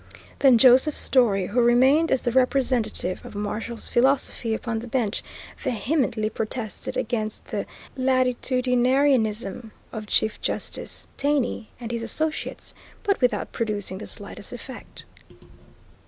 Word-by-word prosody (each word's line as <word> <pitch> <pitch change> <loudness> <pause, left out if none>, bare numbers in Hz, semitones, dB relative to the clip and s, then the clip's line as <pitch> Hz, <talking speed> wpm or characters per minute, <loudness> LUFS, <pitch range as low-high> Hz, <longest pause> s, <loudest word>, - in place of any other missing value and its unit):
Then 265 -4 +6
Joseph 260 +5 +6
Story, 210 -8 +3
who 235 +6 +1
remained 260 +7 +4
as 265 - +2
the 240 - +1
representative 250 -7 +1
of - - -10
Marshall's 215 +3 -3
philosophy 250 -3 +1
upon 230 -1 -3
the 240 - -8
bench, 230 -3 -1 0.4
vehemently 245 -2 0
protested 220 -1 -4
against 220 -2 -2
the - - -4 0.3
latitudinarianism 250 -3 +1 0.2
of 215 -1 -6
Chief 215 +1 +1
Justice - - -4
Taney 280 -6 0
and 235 -1 -6
his 235 -1 -2
associates, 310 +7 -3 0.3
but 400 -6 +1
without 245 -5 +1
producing 205 -4 -3
the - - -7
slightest - - -4
effect. - - -10
240 Hz, 120 wpm, -24 LUFS, 220-260 Hz, 0.4 s, Then